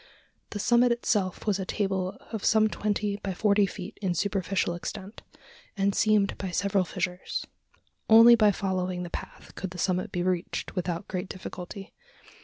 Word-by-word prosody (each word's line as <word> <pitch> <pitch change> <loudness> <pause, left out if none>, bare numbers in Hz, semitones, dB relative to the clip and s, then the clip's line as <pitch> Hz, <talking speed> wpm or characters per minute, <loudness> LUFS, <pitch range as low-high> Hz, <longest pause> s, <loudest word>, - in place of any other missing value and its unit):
The - - -5
summit 240 +3 +4
itself 205 -6 0
was 205 -2 +1
a - - -1
table 190 -2 -2
of 220 -4 -4
some 220 -1 +4
twenty 205 -1 -1
by 195 -2 -4
forty 205 0 +3
feet 190 +2 -8
in 185 -3 0
superficial 190 -1 0
extent, 190 +4 -7 0.6
and 200 0 +2
seamed 210 -2 +2
by 190 - -3
several 195 +1 +1
fissures. 180 +1 -3 0.6
Only 230 +2 +9
by 215 -3 +5
following 185 -2 -2
the 175 - -7
path - - -8
could 190 - -5
the 180 - -10
summit 185 +1 0
be 175 - -1
reached 180 -1 -2
without 180 0 -3
great 185 0 -4
difficulty. 190 +1 -8
195 Hz, 160 wpm, -27 LUFS, 180-210 Hz, 0.6 s, Only